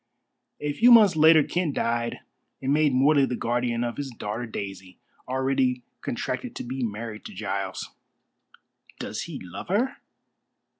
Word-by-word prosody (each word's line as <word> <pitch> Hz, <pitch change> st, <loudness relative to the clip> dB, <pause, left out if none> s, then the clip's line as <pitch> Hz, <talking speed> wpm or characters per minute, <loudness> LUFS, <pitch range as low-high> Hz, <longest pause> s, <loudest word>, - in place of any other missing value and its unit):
A 150 Hz, 0 st, -2 dB
few 240 Hz, +9 st, +5 dB
months 215 Hz, -7 st, +8 dB
later 155 Hz, 0 st, +7 dB
Kent 170 Hz, -3 st, -1 dB
died 120 Hz, 0 st, -1 dB, 0.4 s
and 135 Hz, +1 st, 0 dB
made 150 Hz, -1 st, +3 dB
Morley 135 Hz, +2 st, +4 dB
the 125 Hz, -, -2 dB
guardian 120 Hz, 0 st, -1 dB
of 120 Hz, -1 st, -3 dB
his 140 Hz, -1 st, -4 dB
daughter 115 Hz, 0 st, -5 dB
Daisy, 95 Hz, -3 st, -7 dB, 0.3 s
already 130 Hz, -1 st, 0 dB, 0.2 s
contracted -, -, -4 dB
to -, -, -5 dB
be 130 Hz, +2 st, -5 dB
married 110 Hz, 0 st, -5 dB
to -, -, -9 dB
Giles." 100 Hz, -1 st, -4 dB, 1.1 s
"Does -, -, -4 dB
he -, -, -6 dB
love 90 Hz, -2 st, -8 dB
her?" 230 Hz, +8 st, 0 dB
125 Hz, 145 wpm, -26 LUFS, 115-150 Hz, 1.1 s, months